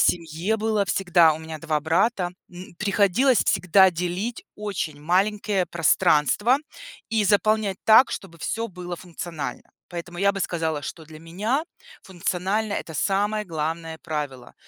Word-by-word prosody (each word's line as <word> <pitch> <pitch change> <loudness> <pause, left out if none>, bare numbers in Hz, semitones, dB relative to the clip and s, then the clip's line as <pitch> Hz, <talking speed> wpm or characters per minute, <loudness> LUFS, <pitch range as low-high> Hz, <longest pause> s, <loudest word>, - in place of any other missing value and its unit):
семье 170 +5 +1
было 215 -2 0
всегда- 175 -4 +4
у - - -7
меня 160 0 -7
2 155 -2 -1
брата- 175 +4 +1 0.2
м, 180 0 -11
приходилось 210 +5 +3
всегда 190 +2 +5
делить 180 +7 -3
очень 180 -8 -4
маленькие 195 +3 +1
пространства 170 - +3 0.5
и 220 -2 +1
заполнять 205 -1 +2
так, 225 +4 +7
чтобы 170 -4 -7
всё 230 +6 -3
было 180 -1 -7
функционально. 165 -6 -7 0.2
Поэтому 175 0 -7
я 200 +1 +3
бы 195 - -5
сказала, 160 -4 -1
что 160 +2 -7
для 155 0 -12
меня 210 - -2 0.4
функционально- 190 +4 -2
это 160 -5 -4
самое 205 +4 0
главное 160 0 -4
правило, 145 -6 -5
180 Hz, 135 wpm, -24 LUFS, 165-205 Hz, 0.5 s, так